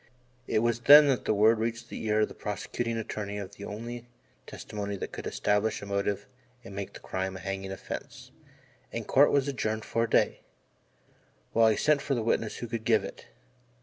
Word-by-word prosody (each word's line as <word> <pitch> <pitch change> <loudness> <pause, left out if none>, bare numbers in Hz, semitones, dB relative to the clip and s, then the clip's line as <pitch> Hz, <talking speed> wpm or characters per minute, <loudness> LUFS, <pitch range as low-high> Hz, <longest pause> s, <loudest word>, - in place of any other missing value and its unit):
It 110 - +1
was 120 -1 +1
then 145 +5 +9
that 130 - 0
word 110 +2 +4
reached 115 +1 -3
the - - -6
ear 110 0 +3
of 105 - +3
the - - -11
prosecuting 115 +3 -3
attorney 105 -2 -4
of 100 -1 -6
the 100 0 -9
only 120 +3 -7 0.4
testimony 100 -1 -5
that 95 - -5
could - - -6
establish 105 +1 0
a - - -5
motive 100 0 -1 0.4
and 100 - -10
make 100 -1 -5
the - - -10
crime 95 0 -3
a - - -9
hanging 95 0 -4
offence, 95 - -7 0.6
and - - -4
Court 145 +2 +5
was 140 -1 +2
adjourned 110 -5 -2
for 115 0 0
a - - -8
day, - - +2 1.1
while 115 0 +5
he 110 - +1
sent 150 -2 +3
for 140 -1 -1
the 115 - -1
witness 115 -1 0
who 120 - -5
could 115 -1 -4
give 110 -1 +3
it. - - -9
110 Hz, 195 wpm, -29 LUFS, 100-115 Hz, 1.1 s, then